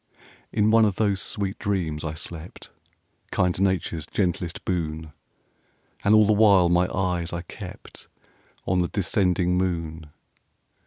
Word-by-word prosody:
In 105 +1 +2
one 115 0 +6
of 105 -3 +2
those 100 -3 +1
sweet 100 -2 -3
dreams 90 -7 -2
I 80 -1 -4
slept, 85 +1 -9 0.6
Kind 90 0 0
Nature's 90 -5 0
gentlest 90 -3 -2
boon! 80 -3 -3 0.9
And 105 +2 +5
all 110 0 +6
the 105 - +4
while 100 -4 +5
my 90 +1 +3
eyes 90 -2 -1
I 85 0 -4
kept - - -11 0.6
On 90 0 +1
the 90 - +1
descending 90 -2 +1
moon. 85 -3 -3
90 Hz, 130 wpm, -25 LUFS, 85-100 Hz, 0.9 s, one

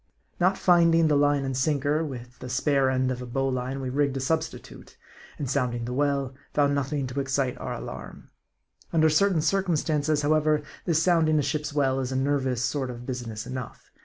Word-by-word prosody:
80 - - -44
M - - -43
A - - -41
R - - -46
D - - -43
I. 175 - -2
Not 195 - -6
finding 165 -2 +4
the 150 - +3
line 145 -1 +2
and 135 -1 -2
sinker, 145 +3 +1
with 125 -4 -8
the 125 - -7
spare 135 +1 +2
end 130 0 +1
of 125 0 -4
a 125 - -6
bowline 130 +1 -2
we 130 -1 -3
rigged 140 0 +1
a - - -2
substitute; 160 +4 -4 0.4
and 145 - -3
sounding 125 -3 -1
the 125 - -4
well, 140 -1 0 0.2
found 145 -1 +3
nothing 140 0 -1
to 130 +2 -4
excite 135 -1 0
our - - -4
alarm. - - -9 0.6
Under 160 -1 +4
certain 180 +1 +3
circum 190 +1 +1
stances, 150 -1 0
however, 155 0 +2 0.2
this 165 -2 +2
sounding 160 -3 +3
a 150 - +2
ship's 150 +2 -2
well 135 -2 +1
is 130 -1 -3
a - - -2
nervous 130 -2 0
sort 135 -1 -1
of 120 0 -8
business 120 -4 -5
enough. 130 -2 -7
140 Hz, 215 wpm, -26 LUFS, 130-155 Hz, 0.6 s, finding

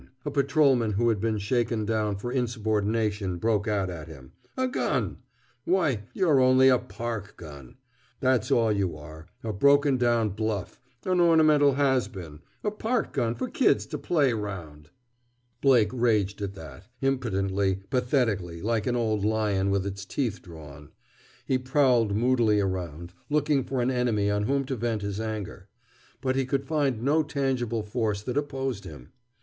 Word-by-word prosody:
a 145 - -2
patrolman 140 -5 +2
who 120 +4 +2
had 110 -3 +1
been 110 -1 0
shaken 110 +1 0
down 105 -1 0
for 120 +5 -5
insubordination 110 -5 -1
broke 110 +2 0
out 100 -3 0
at 85 -5 -7
him. 65 -1 -12 0.3
"A 260 0 +1
gun! 255 - -1 0.5
why, 145 - +1
you're 160 -8 +3
only 130 +1 +5
a 125 -2 +4
park 105 +1 -6
gun! 70 -6 -11 0.4
That's 130 -4 +1
all 115 -2 +3
you 95 -6 -1
are, 80 +2 -11 0.2
a 110 -1 -3
broken 140 +5 +4
down 120 -3 +2
bluff, 105 +1 -4 0.2
an 185 -1 +1
ornamental 155 -4 +5
has 130 -4 +2
been, 85 -9 -10 0.2
a 210 - 0
park 225 +3 -2
gun 115 0 0
for - - -3
kids - - +2
to - - -6
play 145 -8 +2
'round!" 85 -9 -6 0.7
Blake 120 -7 +4
raged 105 -5 +1
at 100 -1 -4
that, 90 +2 -11
impotently, 100 -7 0
pathetically, 115 - 0
like 110 +2 -1
an 125 - +1
old 110 -4 0
lion 105 -3 +1
with 100 -1 0
its 100 0 -5
teeth 110 +1 -3
drawn. 75 -4 -12 0.6
He 130 - +1
prowled 125 -5 +2
moodily 115 -2 +3
around, 90 -3 -3 0.2
looking 145 -2 +2
for 130 -1 -2
an 125 - +1
enemy 115 -5 +1
on 105 0 0
whom 140 +3 0
to 135 0 -3
vent 115 -2 -2
his 100 0 -3
anger. 105 -3 -5 0.5
But 130 -1 0
he 135 -1 0
could 135 +1 -1
find 135 -7 0
no 150 +4 +3
tangible 130 -7 -1
force 105 -2 -2
that 125 - -4
opposed 135 -6 -2
him. 70 -6 -11
115 Hz, 160 wpm, -27 LUFS, 100-130 Hz, 0.7 s, only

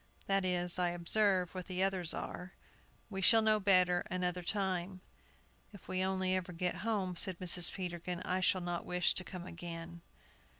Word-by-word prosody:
That 195 -1 +1
is, 180 -1 +1
I 175 -1 +2
observe, 180 +1 +1
what 185 -1 -7
the 185 0 -1
others 190 -4 0
are. 180 +1 -6 0.6
We 195 -1 -4
shall 225 +3 +5
know 215 -1 +3
better 185 -3 +4
another 180 0 -2
time." 185 -1 -2 0.7
"If 200 - -14
we 185 0 -1
only 190 0 0
ever 180 -1 -4
get 180 +1 -2
home," 200 -4 -2
said 185 +1 0
Mrs. 175 -1 +6
Peterkin, 175 -1 -5
"I 185 - -1
shall 185 0 +2
not 175 -1 -3
wish 180 0 +1
to 185 - +1
come 180 -1 -8
again. 170 -1 -8
185 Hz, 170 wpm, -33 LUFS, 175-190 Hz, 0.7 s, Mrs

